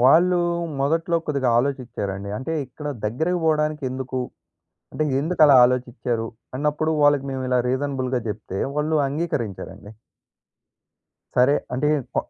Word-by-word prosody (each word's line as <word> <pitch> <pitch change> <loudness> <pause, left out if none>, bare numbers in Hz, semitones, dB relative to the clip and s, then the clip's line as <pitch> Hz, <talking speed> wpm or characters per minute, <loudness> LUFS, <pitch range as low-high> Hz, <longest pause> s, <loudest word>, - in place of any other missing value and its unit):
వాళ్ళూ 170 +8 +5 0.4
మొదట్లో 165 +4 +1
కొద్దిగా 140 -4 0
ఆలోచిచ్చారండి. 115 -7 -3
అంటే 135 +5 -4
ఇక్కడ 150 +4 -9 0.2
దగ్గరకి 160 +12 0
పోవడానికి 155 -1 +1
ఎందుకు? 130 0 -4 0.7
అంటే 155 - -1 0.2
ఎందుకలా 155 -3 +5
ఆలోచిచ్చారు? 125 -2 -1 0.3
అన్నప్పుడు, 150 +2 0
వాళ్ళకి 145 -1 +4
మేము 130 0 -3
ఇలా 125 -1 +2
రీజనబుల్‌గా 130 -1 -1
చెప్తే, 105 -2 -5 0.2
వాళ్ళు 155 +1 +1
అంగీకరించారండి. 110 - -4 1.4
సరే 130 +4 +5 0.2
అంటే 150 +4 +1 0.3
ప - - -6
135 Hz, 110 wpm, -23 LUFS, 125-150 Hz, 1.4 s, వాళ్ళూ